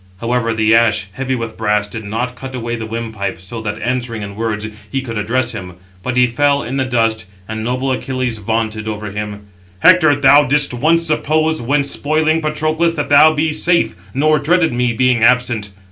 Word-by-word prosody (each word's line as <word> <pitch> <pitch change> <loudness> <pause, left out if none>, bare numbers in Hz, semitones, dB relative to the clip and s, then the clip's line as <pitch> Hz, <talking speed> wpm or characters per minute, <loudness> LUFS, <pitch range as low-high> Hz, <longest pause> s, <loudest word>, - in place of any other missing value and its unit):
However 115 0 -1
the 110 0 +2
ash, 105 -4 +2
heavy 130 +5 -3
with 115 -2 -5
brass, 105 -2 0
did 110 +1 -7
not 115 +5 -3
cut 130 +1 -8
away 120 -1 -3
the 110 -1 -6
windpipe, 110 -5 -4
so 110 +5 -7
that, 105 0 -4
answering 120 -2 -2
in 100 0 -7
words, 110 -1 -3 0.2
he 135 -1 -2
could 115 -3 -6
address 120 +4 0
him. 95 -6 -7 0.3
But 125 +5 -3
he 125 - +6
fell 140 +4 +1
in 130 +3 -4
the 135 - 0
dust, 115 -5 0 0.2
and 110 0 -5
noble 130 +3 -1
Achilles 130 -3 -2
vaunted 110 0 -2
over 105 -1 -5
him: 105 0 -5 0.4
"Hector, 175 -5 +6
thou 145 +1 +5
didst 145 0 +2
once 165 +7 +2
suppose, 155 0 0
when 140 +4 +1
spoiling 155 +3 +1
Patroclus, 155 +2 0
that 145 - -3
thou 150 +2 +7
be 155 0 0
safe, 170 +2 +1 0.2
nor 155 +5 +2
dreaded 165 +1 +2
me, 125 0 +1
being 125 0 +1
absent. 120 -3 +2
125 Hz, 190 wpm, -17 LUFS, 110-145 Hz, 0.4 s, thou